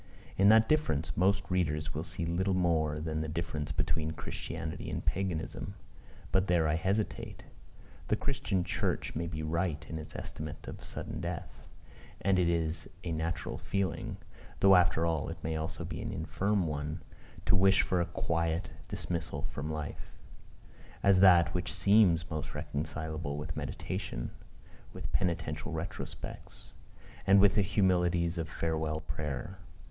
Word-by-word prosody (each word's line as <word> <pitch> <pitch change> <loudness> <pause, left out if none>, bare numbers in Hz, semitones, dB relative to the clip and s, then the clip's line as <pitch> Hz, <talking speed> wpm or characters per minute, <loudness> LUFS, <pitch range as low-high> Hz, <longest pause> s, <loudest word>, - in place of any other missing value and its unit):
In 100 +1 +6
that 110 0 +7
difference, 80 - +1
most 100 +3 +3
readers 75 -4 0
will 80 - -2
see 85 - -4
little 95 +3 +1
more 80 -4 +2
than 80 0 -2
the 80 - -2
difference 80 -2 -3
between 80 +2 0
Christianity 80 - -4
and - - -3
Paganism. 95 +1 -2 0.6
But 95 0 +3
there 85 -3 +3
I 75 - +2
hesitate. 95 +6 -1 0.6
The - - +3
Christian 110 -9 0
church - - -1
may 85 +2 -1
be 80 -2 -4
right 80 -1 -1
in 80 - -4
its 80 -1 -9
estimate 75 0 -6
of - - -7
sudden - - -5
death; - - -5 0.5
and 95 -1 +3
it 85 -2 +3
is 80 -1 0
a 85 - -2
natural 80 +1 -2
feeling, 95 -5 -2 0.4
though 95 -1 +8
after 85 -2 +4
all 80 -3 0
it 80 - -5
may 80 0 -1
also 80 +1 -3
be - - -5
an - - -3
infirm 100 -1 0
one, 75 +1 -3 0.4
to - - +4
wish 95 +1 +5
for 90 -1 +1
a 85 - 0
quiet 85 0 -1 0.2
dismissal 80 -4 -3
from 75 -1 -4
life 75 -2 -5 0.9
as 100 -1 +6
that 90 -3 +7
which 90 -2 -1
seems 90 -6 +4
most 75 -1 -4
reconcilable 75 0 -3
with 75 - -4
meditation, - - -4 0.6
with - - -6
penitential 90 -3 -1
retrospects, - - -6 0.5
and 100 +1 +8
with 100 -1 +6
the 105 - +4
humilities 90 -4 +2
of 80 -2 -2
farewell 80 -1 -1
prayer. 75 +6 -4
85 Hz, 150 wpm, -32 LUFS, 80-95 Hz, 0.9 s, though